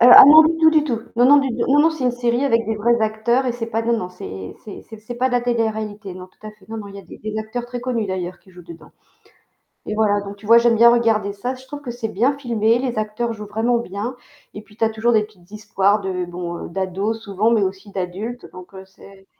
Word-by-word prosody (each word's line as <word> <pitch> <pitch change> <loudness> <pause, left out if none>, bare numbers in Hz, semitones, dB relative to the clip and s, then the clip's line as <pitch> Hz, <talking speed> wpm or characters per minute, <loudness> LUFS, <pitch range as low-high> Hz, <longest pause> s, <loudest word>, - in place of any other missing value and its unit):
Heu, 240 - +7
ah - - +12
non, 310 +2 +9
du 325 +1 +1
tout 320 - +6
du 310 -1 +3
tout, 240 -7 -2 0.2
non 245 - +4
non, 290 +2 +7
du 275 -1 0
tout, 235 0 -2
non 285 +2 +5
non, 320 - +4
c'est 315 -5 -5
une 250 - +2
série 245 +2 0
avec 230 -4 +2
des 220 0 -2
vrais 235 +2 +1
acteurs 220 +4 0
et 245 - 0
c'est 235 -1 -5
pas 225 0 -2
non, 235 0 +1
non, 180 - -5
c'est 95 - -9
c'est 205 - -9
c'est 220 - -11
c'est 240 +3 -8
pas 255 - +1
de 260 - -2
la 245 - +2
télé-réalité, 220 -4 -3
non, 185 0 -10
tout 215 - -15
à 215 - -8
fait, 210 0 -24
non, 225 - -6
non, 210 -2 -7
il 200 - -12
y - - -8
a - - -17
des - - -13
des 215 0 -6
acteurs 220 +3 -5
très 245 0 -6
connus 240 -4 -2
d'ailleurs 185 -1 -4
qui 190 - -22
jouent 180 - -13
dedans. 170 -1 -14 1.0
Et 215 - -3
voilà, 205 -2 +2
donc 200 0 -8
tu 205 - -15
vois 230 +2 +7
j'aime 235 -1 +3
bien 235 +1 +7
regarder 220 -4 +1
ça, 245 +6 -4
je 260 +1 -15
trouve 290 +1 -8
que 260 - -8
c'est 235 -1 -4
bien 245 +7 0
filmé, 230 -4 +1
les 245 -4 -2
acteurs 215 +2 -3
jouent 210 -1 -9
vraiment 225 +3 0
bien 220 +3 -5 0.4
et 205 - -8
puis 215 0 -22
tu - - -1
as 225 - +3
toujours 220 +2 0
des 220 -2 +3
petites 200 -4 -17
histoires 210 -1 0
de, 185 -2 -3
bon, 175 -1 -6
d'ados 195 +4 -3
souvent 200 +1 0
mais 220 -4 +3
aussi 195 +2 -5
d'adultes 195 +7 -5
donc 180 -1 -12
c'est 195 0 -18
220 Hz, 270 wpm, -20 LUFS, 200-240 Hz, 1.0 s, ah